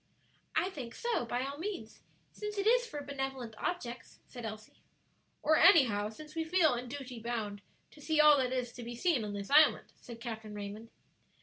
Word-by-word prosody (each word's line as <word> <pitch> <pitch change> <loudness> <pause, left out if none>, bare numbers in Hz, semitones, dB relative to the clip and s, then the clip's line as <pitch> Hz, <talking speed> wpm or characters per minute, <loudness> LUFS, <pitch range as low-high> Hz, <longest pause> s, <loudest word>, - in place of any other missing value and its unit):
"I 350 +4 +1
think 250 -8 -7
so, 470 - -1
by 245 +2 -1
all 280 +2 -6
means, 340 - -6 0.3
since 420 0 -6
it 400 - 0
is 485 +2 +4
for 295 -8 -6
benevolent 270 -4 -4
objects," 245 -9 -4
said 240 -2 -7
Elsie. 215 0 -10 0.6
"Or 315 +1 +4
anyhow, 250 - +6
since 300 +8 -11
we 325 - -1
feel 320 -3 +3
in 245 +1 -4
duty 255 -3 -7
bound 220 -3 -4 0.3
to 295 - -16
see 315 +1 0
all 300 -1 +8
that 255 -1 0
is 250 -2 -2
to 245 - -9
be 240 +1 -6
seen 290 -3 +1
on 205 -1 -4
this 200 +2 -6
island," 300 +2 +5
said 235 -1 -11
Captain 220 -3 -6
Raymond. 205 +2 -7
255 Hz, 190 wpm, -32 LUFS, 230-315 Hz, 0.6 s, all